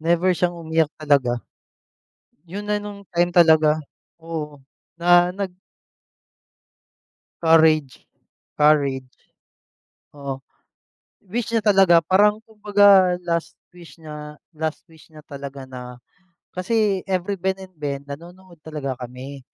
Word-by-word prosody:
never 170 +3 +2
siyang 175 0 -1
umiyak 160 -2 0
talaga. 140 -5 +2 1.1
'Yon 205 +4 -6
na 210 0 0
no'ng 200 -1 -9
time 175 +1 +2
talaga, 160 -3 +5 0.4
oo, 160 -3 -6 0.4
na 175 +1 +5
nag 190 -1 -4 1.9
Courage, 160 -4 +3 0.5
Courage. 145 -3 +3 1.1
Oo, 135 -2 -6 0.8
wish 230 +5 -3
niya 230 - +2
talaga, 190 -4 +6
parang 205 +5 +3
kumbaga, 205 -4 +4
last 170 -1 -2 0.2
wish 170 -1 -14
niya 150 -1 -9 0.2
last 155 0 -4
wish 160 0 -20
niya 155 - -15
talaga 140 -1 -8
na 125 -1 -9 0.5
kasi 200 +1 0
every 190 0 -2
Ben&Ben, 180 -7 -4
nanonood 170 +4 -12
talaga 150 -4 -5
kami. 130 +3 -8
165 Hz, 105 wpm, -22 LUFS, 150-185 Hz, 1.9 s, talaga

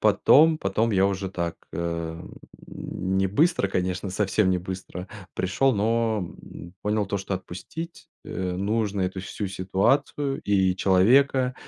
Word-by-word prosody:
потом 145 +10 +5
потом 115 -6 0
я 95 0 +4
уже 95 -1 -2
так, 85 -3 -3 0.2
э, - - -5
м, 85 0 -4 0.3
не 95 +1 -2
быстро, 145 - +2
конечно, 95 0 -2
совсем 100 0 +1
не 90 - +2
быстро 90 0 -7 0.3
пришел, 115 +9 +1
но, 110 +1 +1 0.2
м, 85 +2 -11
понял 105 0 0
то, 100 - -2
что 100 0 -5
отпустить, 155 - -8 0.2
э, 90 -1 -3
нужно 100 +2 -1
эту 95 0 -2
всю 100 +2 -5
ситуацию, 100 +9 0
и 95 -2 +2
человека, 125 +8 +4
95 Hz, 140 wpm, -25 LUFS, 95-110 Hz, 0.3 s, потом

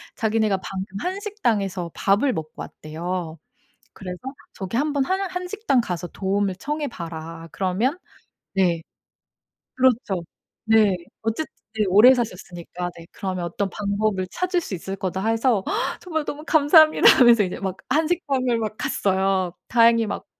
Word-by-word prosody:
자기네가 220 -2 +1
방금 190 +1 -6
한식당에서 230 - -2
밥을 220 +7 +2
먹고 155 -4 -5
왔대요. 165 +1 -5 0.5
그래서 180 -2 -7 0.3
저기 190 +3 -4
한번 285 0 +1
"한 375 +6 0
한식당 360 - 0
가서 180 -5 -4
도움을 195 +2 -1
청해 295 +8 -3
봐라." 165 - -7
그러면 200 - 0 0.6
네. 175 -4 +2 0.9
그렇죠. 240 -8 +1 0.4
네. 220 -3 +4 0.3
어쨌든 225 +8 -2 0.3
네 215 - +3
오래 210 +7 +8
사셨으니까 180 -6 -5
네 170 0 -12
"그러면 185 -2 -4
어떤 195 +3 -2
방법을 200 -1 -1
찾을 365 0 0
수 265 - -6
있을 190 +2 -5
거다." 190 +1 -3
해서 225 -2 +2 0.4
정말 320 -4 -3
"너무 295 +1 -6
감사합니다." 315 0 +5
하면서 235 -4 +7
이제 180 - -5
막 190 -2 -3
한식당을 280 -5 +1
막 215 -1 -3
갔어요. 190 -2 0 0.2
다행히 230 -1 +5
막 210 - -5
210 Hz, 300 characters per minute, -23 LUFS, 185-260 Hz, 0.9 s, 오래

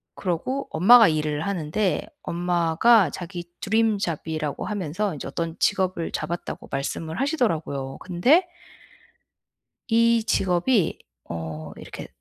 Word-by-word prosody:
그러고 205 +10 -2
엄마가 225 +6 +7
일을 155 -1 -1
하는데 190 +1 -1
엄마가 175 +4 +3
자기 175 +3 -6 0.2
드림 220 +1 +2
잡이라고 160 -5 -3
하면서 200 0 -2
이제 145 - -6
어떤 165 -1 -4
직업을 185 -4 0
잡았다고 170 +3 -5
말씀을 160 +5 -3
하시더라고요. 165 - -1
근데 245 - +3 1.4
이 230 0 +4
직업이 190 -2 +1 0.3
어 80 -1 -6
이렇게 - - -9
175 Hz, 270 characters per minute, -24 LUFS, 160-215 Hz, 1.4 s, 엄마가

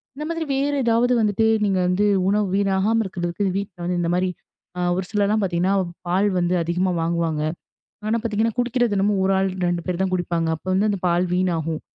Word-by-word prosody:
இந்த 300 +2 -5
மாதிரி 330 -1 -2
வேற 280 +2 0
ஏதாவது 235 +2 +3
வந்துட்டு, 215 0 +2 0.2
நீங்க 195 -2 +1
வந்து 180 +3 +2 0.2
உணவு 205 0 +1
வீணாகாம 200 +3 +2
இருக்கிறதுக்கு, 180 +1 -3
வீட்டுல 180 -3 -3
இந்த 170 - 0
மாரி 185 +1 +1 0.5
அ - - -1
ஒரு 185 0 -2
சிலர்லாம் 210 0 +1
பாத்தீங்கன்னா, 185 +1 +1 0.3
பால் 190 +4 +2
வந்து 175 +1 +1
அதிகமா 180 +3 0
வாங்குவாங்க. 165 -2 -1 0.7
ஆனா 230 +2 +1
பாத்தீங்கன்னா, 220 0 0
குடிக்கிறது 245 -2 +1
என்னமோ, 200 +1 +2
1 195 - +2
ஆள் 195 0 +1 0.2
2 175 -1 -1
பேர் 180 -1 -2
தான் 190 -1 -1
குடிப்பாங்க. 170 -2 -1
அப்போ, 175 - -11 0.2
அந்தப் 200 -3 -2
பால் 175 +1 +2
வீணாகும். 165 -4 -1
190 Hz, 175 wpm, -22 LUFS, 175-210 Hz, 0.7 s, ஏதாவது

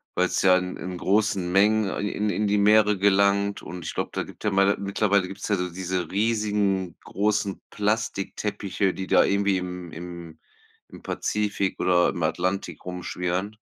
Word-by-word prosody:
weil's 90 0 +1
ja 95 -1 +6
in 90 0 -4
in 90 -1 -6
großen 100 -2 +1
Mengen, 105 +2 +3
äh, - - -4
in 105 +1 -1
in 105 +3 0
die 105 +1 +2
Meere 105 0 +5
gelangt 100 +1 +2
und 90 0 -8
ich - - -5
glaube, - - -3
da - - -1
gibt - - -12
ja 105 - +2
ma 100 0 +4
ja, 100 - +2
mittlerweile 100 -1 +1
gibt's 95 +2 -7
ja 105 - +2
so 90 0 -2
diese 90 0 -3
riesigen 105 -4 0
großen 105 -1 -1
Plastikteppiche, 100 -2 -1
die 95 - -5
da - - +5
irgendwie 100 -1 +2
im 90 -1 -6
im 85 -1 -9 0.5
-im - - -12
Pazifik 105 -2 -1
oder 90 -1 +3
im 85 - -3
Atlantik 90 +1 -2
rumschwirren. 90 +2 -3
100 Hz, 170 wpm, -25 LUFS, 90-105 Hz, 0.5 s, ja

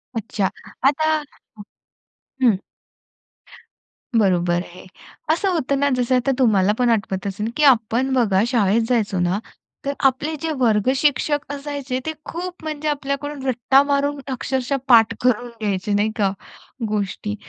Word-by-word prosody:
अच्छा. 210 -3 -1 0.4
आता 315 +3 +2 1.3
हं. 220 -6 +4 1.6
बरोबर 175 -4 +2
आहे. 180 +1 -13 0.5
असं 380 +4 +1
होतं 280 -4 0
ना 285 0 +2
जसं 250 +1 +1
आता 255 +2 +1
तुम्हाला 205 -6 +4
पण 245 -1 +2
आठवत 200 -3 -1
असेल 210 +3 -3
की 300 - +2
आपण 255 0 +3
बघा 210 -7 +3
शाळेत 230 -3 +2
जायचो 215 -6 +1
ना, 180 +3 +1 0.5
तर 280 - 0
आपले 280 +4 +1
जे 325 - -1
वर्गशिक्षक 265 +6 +1
असायचे, 280 -2 -4
ते 315 - -2
खूप 355 0 -6
म्हणजे 310 -1 -4
आपल्याकडून 280 -1 -3
रट्टा 260 +2 +4
मारून 285 0 0
अक्षरशः 260 +1 -1
पाठ 230 -3 +6
करून 245 -1 +1
घ्यायचे. 205 -1 -1
नाही 210 +2 +1
का? 200 -3 +2 0.6
गोष्टी. 210 0 -3
250 Hz, 130 wpm, -21 LUFS, 210-280 Hz, 1.6 s, पाठ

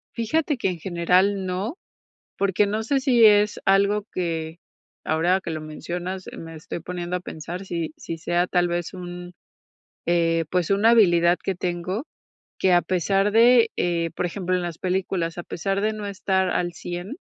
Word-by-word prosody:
Fíjate 295 +6 0
que 195 - 0
en 175 -2 -5
general 185 +3 +2
no, 190 - -3 0.6
porque 200 +1 +2
no 215 +2 -1
sé 270 +4 +1
si 250 -4 +4
es 210 0 +5
algo 200 +2 +3
que, 165 -2 -3 0.5
ahora 175 +4 +2
que 170 - -5
lo 155 -1 -3
mencionas, 175 +4 -5
me 165 0 -9
estoy 160 +2 -7
poniendo 175 +1 -4
a - - -4
pensar 175 +2 -7
si 170 -4 -3
si 165 -1 -6
sea 175 +2 0
tal 175 -1 +1
vez 175 +2 -3
un, 175 -1 -8 0.7
eh, 165 -1 +2
pues, 180 -1 0
una 205 +3 +4
habilidad 175 -6 +5
que 195 - -1
tengo, 180 - -3 0.5
que 185 - +3
a 175 - +5
pesar 195 +3 +1
de, 230 +1 +6
eh, 170 -1 0
por - - 0
ejemplo, 185 0 -1
en 180 - -2
las 170 -2 -5
películas, 180 -2 -2
a 175 - -3
pesar 195 +3 -2
de 215 +1 +1
no 210 -1 -6
estar 190 -1 0
al 175 -1 -1
100, 175 - -6
180 Hz, 175 wpm, -24 LUFS, 175-200 Hz, 0.7 s, de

